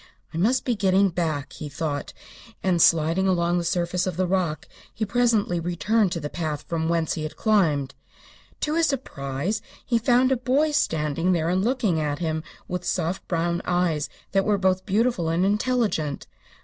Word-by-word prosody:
"I -, -, -4 dB
must 240 Hz, +9 st, +2 dB
be 245 Hz, -, +1 dB
getting 195 Hz, -1 st, +3 dB
back," 155 Hz, -5 st, -2 dB
he 150 Hz, -, -7 dB
thought, 145 Hz, 0 st, -3 dB, 0.5 s
and 180 Hz, -3 st, +2 dB
sliding 165 Hz, +4 st, +4 dB
down 170 Hz, 0 st, +1 dB
the -, -, -2 dB
surface 175 Hz, +1 st, 0 dB
of 180 Hz, -3 st, -3 dB
the 185 Hz, -, +2 dB
rock 180 Hz, -4 st, -1 dB, 0.2 s
he 220 Hz, -, -3 dB
presently 220 Hz, -5 st, +1 dB
returned 185 Hz, +4 st, +1 dB
to 170 Hz, -, -2 dB
the 150 Hz, -, -4 dB
path 155 Hz, -2 st, -4 dB
from 165 Hz, -1 st, -2 dB
whence 165 Hz, -2 st, +1 dB
he 155 Hz, -, -4 dB
had 155 Hz, 0 st, -5 dB
climbed. 155 Hz, -11 st, +2 dB, 0.7 s
To 300 Hz, -, 0 dB
his 330 Hz, 0 st, +3 dB
surprise 185 Hz, -, -3 dB, 0.2 s
he 235 Hz, -3 st, +2 dB
found 250 Hz, +2 st, +3 dB
a 265 Hz, -, +3 dB
boy 270 Hz, +5 st, +1 dB
standing 165 Hz, -, +1 dB
there 165 Hz, -1 st, 0 dB
and 185 Hz, +2 st, +1 dB
looking 225 Hz, -8 st, +1 dB
at 150 Hz, -1 st, -1 dB
him 160 Hz, -2 st, -2 dB, 0.3 s
with 180 Hz, 0 st, -3 dB
soft 175 Hz, +1 st, -2 dB
brown 170 Hz, 0 st, 0 dB
eyes 175 Hz, -4 st, 0 dB, 0.2 s
that 195 Hz, 0 st, +2 dB
were 210 Hz, 0 st, +2 dB
both 185 Hz, 0 st, +1 dB
beautiful 210 Hz, -4 st, +1 dB
and 170 Hz, +3 st, +2 dB
intelligent. 210 Hz, -, 0 dB
180 Hz, 175 wpm, -24 LUFS, 160-215 Hz, 0.7 s, sliding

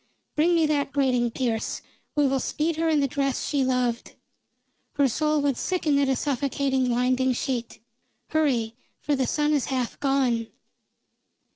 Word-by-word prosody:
Bring 335 Hz, +3 st, +3 dB
me 325 Hz, -1 st, +3 dB
that 290 Hz, -2 st, 0 dB
grating, 255 Hz, -4 st, +2 dB
Pearse. 230 Hz, -2 st, -2 dB, 0.3 s
We 295 Hz, -1 st, +3 dB
will 270 Hz, 0 st, +1 dB
speed 310 Hz, +4 st, -1 dB
her 325 Hz, 0 st, +1 dB
in 305 Hz, -2 st, +3 dB
the 275 Hz, -, +2 dB
dress 275 Hz, 0 st, -1 dB
she 285 Hz, -2 st, +1 dB
loved. 250 Hz, -2 st, -1 dB, 0.8 s
Her 285 Hz, -2 st, +3 dB
soul 300 Hz, +4 st, +1 dB
would 280 Hz, -4 st, +1 dB
sicken 315 Hz, -6 st, 0 dB
at 275 Hz, -1 st, +2 dB
a 265 Hz, -, +2 dB
suffocating 270 Hz, -1 st, 0 dB
winding 255 Hz, +1 st, +2 dB
sheet. 245 Hz, -2 st, -3 dB, 0.5 s
Hurry, 260 Hz, -8 st, +1 dB, 0.3 s
for 290 Hz, -, 0 dB
the 260 Hz, -2 st, 0 dB
sun 300 Hz, 0 st, +1 dB
is 285 Hz, -4 st, +1 dB
half 255 Hz, -3 st, -3 dB
gone!" 260 Hz, -5 st, +1 dB
275 Hz, 155 wpm, -25 LUFS, 250-295 Hz, 0.8 s, Bring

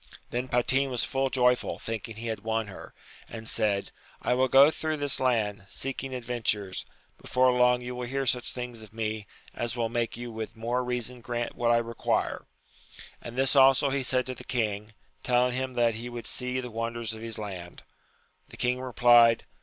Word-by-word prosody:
Then 125 Hz, +2 st, -2 dB
Patin 130 Hz, +3 st, +2 dB
was 125 Hz, -2 st, -1 dB
full 135 Hz, 0 st, 0 dB
joyful, 125 Hz, -1 st, +2 dB
thinking 115 Hz, 0 st, -5 dB
he 115 Hz, +2 st, -7 dB
had 110 Hz, -1 st, -2 dB
won 110 Hz, 0 st, -1 dB
her, 100 Hz, -, -11 dB, 0.3 s
and 115 Hz, -1 st, -8 dB
said, 100 Hz, -3 st, 0 dB, 0.3 s
I -, -, +1 dB
will 130 Hz, +1 st, +3 dB
go 135 Hz, +4 st, +7 dB
through 155 Hz, -1 st, -2 dB
this 145 Hz, -1 st, 0 dB
land, 110 Hz, -6 st, 0 dB
seeking 135 Hz, 0 st, -4 dB
adventures; 115 Hz, -6 st, -2 dB, 0.3 s
before 130 Hz, 0 st, +3 dB
long 125 Hz, 0 st, +3 dB
you 125 Hz, +1 st, -5 dB
will 125 Hz, 0 st, -4 dB
hear 135 Hz, +2 st, -1 dB
such 125 Hz, -1 st, 0 dB
things 125 Hz, -2 st, -6 dB
of 110 Hz, -1 st, -13 dB
me, 110 Hz, -2 st, -3 dB, 0.3 s
as 120 Hz, 0 st, -2 dB
will 115 Hz, -2 st, 0 dB
make 115 Hz, -1 st, -1 dB
you 120 Hz, 0 st, -6 dB
with 110 Hz, 0 st, -6 dB
more 120 Hz, +3 st, -1 dB
reason 125 Hz, 0 st, -3 dB
grant 120 Hz, 0 st, -3 dB
what 120 Hz, -1 st, +1 dB
I 120 Hz, -, +5 dB
require. 115 Hz, -1 st, -1 dB, 0.7 s
And 120 Hz, -, -8 dB
this 135 Hz, +2 st, +2 dB
also 135 Hz, +1 st, +6 dB
he 140 Hz, 0 st, 0 dB
said 130 Hz, 0 st, +1 dB
to 130 Hz, -, -4 dB
the 125 Hz, -, -11 dB
king, 105 Hz, -3 st, -2 dB, 0.3 s
telling 125 Hz, 0 st, +2 dB
him 130 Hz, 0 st, -3 dB
that 120 Hz, -1 st, +3 dB
he 115 Hz, +2 st, -5 dB
would 120 Hz, -1 st, -7 dB
see 125 Hz, 0 st, -1 dB
the 125 Hz, -2 st, -6 dB
wonders 115 Hz, 0 st, -3 dB
of 110 Hz, -, -9 dB
his 115 Hz, -1 st, -4 dB
land. 95 Hz, -5 st, -7 dB, 0.7 s
The -, -, -12 dB
king 125 Hz, +1 st, 0 dB
replied. 120 Hz, -2 st, +5 dB
120 Hz, 190 wpm, -28 LUFS, 115-125 Hz, 0.7 s, go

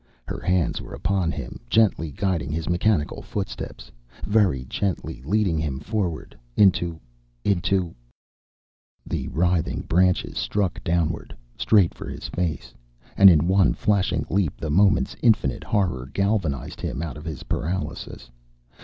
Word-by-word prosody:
Her -, -, -4 dB
hands 90 Hz, -3 st, 0 dB
were -, -, -8 dB
upon 95 Hz, -4 st, 0 dB
him, -, -, -6 dB
gently 100 Hz, -, +3 dB
guiding 85 Hz, -3 st, -1 dB
his 80 Hz, +1 st, -3 dB
mechanical 90 Hz, -2 st, +1 dB
footsteps, 95 Hz, -10 st, -6 dB, 0.3 s
very 95 Hz, -, +2 dB
gently 90 Hz, -6 st, -3 dB
leading 95 Hz, 0 st, +1 dB
him 70 Hz, -4 st, -2 dB
forward 90 Hz, -1 st, -3 dB, 0.2 s
into 90 Hz, -5 st, +3 dB, 0.5 s
into 95 Hz, -2 st, +1 dB, 1.1 s
The -, -, -3 dB
writhing 85 Hz, 0 st, 0 dB
branches 90 Hz, +1 st, +1 dB
struck 100 Hz, -4 st, -1 dB
downward, 85 Hz, -1 st, -1 dB, 0.2 s
straight 100 Hz, -6 st, +3 dB
for -, -, -8 dB
his -, -, -6 dB
face. 85 Hz, -3 st, -3 dB, 0.4 s
And 100 Hz, 0 st, +9 dB
in 85 Hz, -2 st, +4 dB
one 95 Hz, 0 st, +4 dB
flashing 105 Hz, -4 st, +1 dB
leap 90 Hz, -4 st, 0 dB
the 80 Hz, -, -3 dB
moment's 100 Hz, +5 st, +3 dB
infinite 105 Hz, -, +2 dB
horror 65 Hz, -11 st, -1 dB
galvanized 95 Hz, -, -1 dB
him 75 Hz, -, -3 dB
out 80 Hz, -, -5 dB
of 75 Hz, -, -9 dB
his 80 Hz, -4 st, -6 dB
paralysis. 80 Hz, -7 st, -4 dB
90 Hz, 130 wpm, -24 LUFS, 80-100 Hz, 1.1 s, And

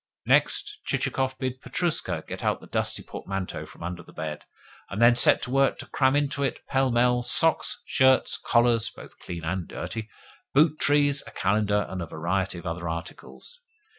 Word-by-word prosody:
Next, -, -, +2 dB
Chichikov 130 Hz, 0 st, -1 dB
bid 130 Hz, 0 st, -4 dB
Petrushka 175 Hz, -3 st, -2 dB
get -, -, -6 dB
out -, -, +1 dB
the -, -, -13 dB
dusty -, -, -2 dB
portmanteau 95 Hz, -1 st, -5 dB
from -, -, -13 dB
under 85 Hz, 0 st, -5 dB
the -, -, -16 dB
bed, 75 Hz, -1 st, -6 dB, 0.4 s
and 100 Hz, -, -5 dB
then 120 Hz, +1 st, +6 dB
set 120 Hz, -, +5 dB
to 125 Hz, -, -5 dB
work 135 Hz, 0 st, +3 dB
to -, -, -7 dB
cram 130 Hz, 0 st, +2 dB
into 145 Hz, -1 st, 0 dB
it, 135 Hz, -, -1 dB
pell 135 Hz, -1 st, +2 dB
mell, 125 Hz, 0 st, +3 dB
socks, 160 Hz, +7 st, +2 dB
shirts, 130 Hz, -1 st, +3 dB
collars 120 Hz, -1 st, +3 dB
(both -, -, -14 dB
clean 85 Hz, -2 st, -7 dB
and 90 Hz, +2 st, -3 dB
dirty), 115 Hz, -1 st, -6 dB, 0.5 s
boot 155 Hz, +1 st, +4 dB
trees, 145 Hz, -1 st, +3 dB
a -, -, -10 dB
calendar, 105 Hz, 0 st, +1 dB
and 95 Hz, -1 st, -5 dB
a 85 Hz, -, -5 dB
variety 90 Hz, +4 st, -2 dB
of 85 Hz, -, -10 dB
other 85 Hz, 0 st, -4 dB
articles. 85 Hz, -, -8 dB
120 Hz, 175 wpm, -26 LUFS, 95-135 Hz, 0.5 s, then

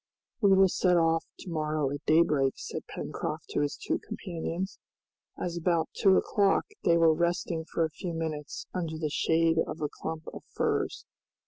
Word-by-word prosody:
"We 200 Hz, -2 st, +5 dB
will 190 Hz, 0 st, +6 dB
set 180 Hz, -1 st, +2 dB
off 165 Hz, -1 st, +3 dB, 0.2 s
to 180 Hz, -, -7 dB
morrow 155 Hz, -3 st, 0 dB
at 145 Hz, +1 st, -5 dB
daybreak," 150 Hz, -4 st, +4 dB
said -, -, -6 dB
Pencroft -, -, -5 dB
to -, -, -1 dB
his 145 Hz, -1 st, -1 dB
two -, -, -1 dB
companions, 185 Hz, -2 st, -5 dB, 0.6 s
as 175 Hz, -1 st, -3 dB
about 170 Hz, -1 st, +1 dB
two 195 Hz, -1 st, +4 dB
o'clock 200 Hz, -2 st, +2 dB, 0.2 s
they 170 Hz, -1 st, +4 dB
were 165 Hz, -1 st, +5 dB
resting 170 Hz, 0 st, -1 dB
for 165 Hz, 0 st, 0 dB
a 160 Hz, -, -5 dB
few 170 Hz, +2 st, -5 dB
minutes 155 Hz, -2 st, -4 dB
under 165 Hz, -3 st, -3 dB
the 155 Hz, -2 st, -2 dB
shade 165 Hz, +1 st, +2 dB
of 155 Hz, -, -6 dB
a 150 Hz, -1 st, -1 dB
clump 160 Hz, 0 st, -4 dB
of -, -, -8 dB
firs. -, -, 0 dB
165 Hz, 175 wpm, -29 LUFS, 155-175 Hz, 0.6 s, will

